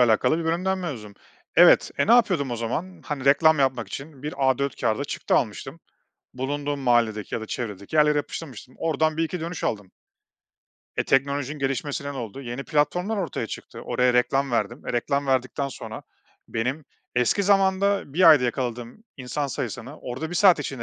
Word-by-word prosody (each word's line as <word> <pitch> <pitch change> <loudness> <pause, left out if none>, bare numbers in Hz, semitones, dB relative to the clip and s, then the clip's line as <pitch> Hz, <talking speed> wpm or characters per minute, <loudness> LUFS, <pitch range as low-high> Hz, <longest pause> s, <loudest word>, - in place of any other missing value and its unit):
alakalı 125 +5 +3
bir 165 - -3
bölümden 185 +4 0
mezunum. 120 - -6 0.4
Evet. - - +7
E, - - +2
ne 230 - +5
yapıyordum 185 - +3
o 120 - -2
zaman? 160 +11 -4
Hani, 145 -3 -4
reklam 150 +2 +5
yapmak 130 -4 +1
için 140 -1 -8
bir 150 - -4 0.2
A4 140 +2 -1
kağıda 110 - 0
çıktı - - -2
almıştım, - - -2 0.5
bulunduğum 145 +2 -3
mahalledeki 115 -4 +1
ya - - -3
da 110 - -5
çevredeki 105 +2 -5
yerlere 150 -1 +4
yapıştırmıştım. 130 -5 -6
Oradan 155 0 0
bir 165 - +2
iki 175 +2 -3
dönüş 165 +1 -5
aldım. 105 -4 -2 1.1
E, - - +2
teknolojinin 140 +1 0
gelişmesiyle 140 +1 -2
ne - - -8
oldu? 120 0 -6
Yeni 125 +1 -6
platformlar 180 +8 0
ortaya 180 -8 -3
çıktı, - - -8
oraya 125 0 +1
reklam 135 +2 +2
verdim. 110 -4 -2
E, - - -2
reklam 140 +4 0
verdikten 135 +1 0
sonra - - -8 0.5
benim 125 +7 -2 0.3
eski 125 - +2
zamanda 195 -4 +2
1 175 -1 +7
ayda 140 -5 +6
yakaladığım 120 - -4
insan 135 +2 -3
sayısını 125 +2 -5
orada 130 +7 -5
1 - - -5
saat 185 -4 +6
içinde 135 -4 -5
140 Hz, 170 wpm, -24 LUFS, 125-160 Hz, 1.1 s, Evet